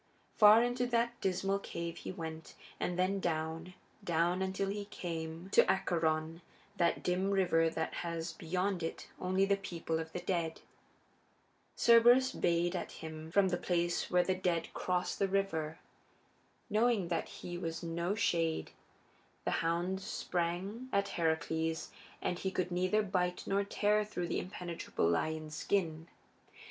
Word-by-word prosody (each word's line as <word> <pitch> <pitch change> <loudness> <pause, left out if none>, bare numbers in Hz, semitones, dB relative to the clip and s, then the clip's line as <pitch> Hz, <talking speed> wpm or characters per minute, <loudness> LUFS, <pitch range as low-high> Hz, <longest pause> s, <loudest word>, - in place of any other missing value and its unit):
Far 215 +2 +8
into 245 0 0
that 235 0 0
dismal 195 +1 0
cave 170 -3 -5
he - - -6
went, 160 -3 -7 0.2
and 180 - -1
then 185 +2 +1
down, 165 +1 -2 0.3
down, 175 +2 +1
until 190 +1 -1
he 205 0 -3
came 165 -2 -5
to - - +7
Acheron, 160 -2 0 0.4
that 170 -2 +2
dim 185 +2 +1
river 175 -4 +3
that 160 0 -3
has 170 -1 -3
beyond 180 +3 -1
it 165 - -5
only 185 +1 +2
the 200 0 +2
people 165 -4 -3
of 160 0 -5
the 180 - -4
dead. 170 -3 -1 1.2
Cerberus 240 +3 +6
bayed 175 +1 +1
at 180 - -4
him 160 0 -8
from 190 +2 +4
the 175 - 0
place 175 -1 0
where 180 0 +4
the 185 - +1
dead 180 -3 -1
cross 180 0 -1
the 195 - +1
river. 170 -5 -1 0.9
Knowing 215 -4 +2
that 170 - -1
he 175 - -7
was 165 0 -4
no 170 +3 -1
shade, 165 -7 0 0.7
the - - +1
hound 175 +3 0
sprang 190 +6 -3
at 200 0 +1
Heracles, 160 0 -1 0.3
but 180 - -1
he 190 - -1
could 185 -1 -2
neither 185 +4 +2
bite 180 -2 -1
nor 200 +1 +1
tear 210 +1 +2
through 180 -5 -4
that - - 0
impenetrable 175 - -3
lion's 155 - -1
skin. 165 -2 -1
180 Hz, 145 wpm, -33 LUFS, 165-195 Hz, 1.2 s, Far